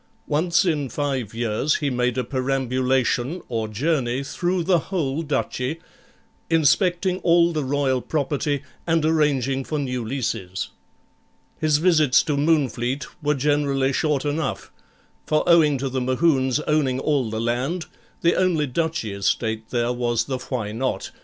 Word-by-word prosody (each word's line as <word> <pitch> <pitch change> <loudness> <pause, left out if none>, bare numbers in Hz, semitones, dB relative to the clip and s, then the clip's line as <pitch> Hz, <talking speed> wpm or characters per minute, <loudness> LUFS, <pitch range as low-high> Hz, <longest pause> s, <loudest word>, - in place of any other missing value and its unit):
Once 170 +5 +2
in 150 -6 0
five 135 -7 -2
years 115 +5 0
he 145 -2 -1
made 125 0 0
a 130 - +1
perambulation, 130 +2 0
or 110 -2 -2
journey, 130 +2 -1
through 175 +5 -1
the 175 0 +3
whole 160 -6 -1
duchy, 145 -1 -2 0.7
inspecting 180 +3 +2
all 170 -1 +4
the 155 -2 -1
Royal 135 -1 0
property, 145 -1 -1 0.2
and 165 -2 +2
arranging 140 -4 +1
for 155 - -3
new 125 -4 -2
leases. 110 -7 -3 0.9
His 155 -2 +3
visits 155 -5 +4
to 150 - -1
Moonfleet 140 -3 +1 0.2
were 150 0 +1
generally 140 -1 +1
short 150 -1 0
enough, 145 0 -2 0.6
for 155 +2 +1
owing 160 -5 +5
to 135 +1 -2
the 130 0 -2
Mohunes 130 0 +2
owning 140 -4 +1
all 135 -5 0
the 110 0 -3
land, 125 +9 -1 0.4
the 170 - +4
only 175 -5 +2
duchy 160 -5 -2
estate 110 +3 -1
there 120 0 0
was 120 -2 0
the 130 -2 -4
Why 120 -5 -4
Not? 130 +4 -2
140 Hz, 140 wpm, -23 LUFS, 125-155 Hz, 0.9 s, owing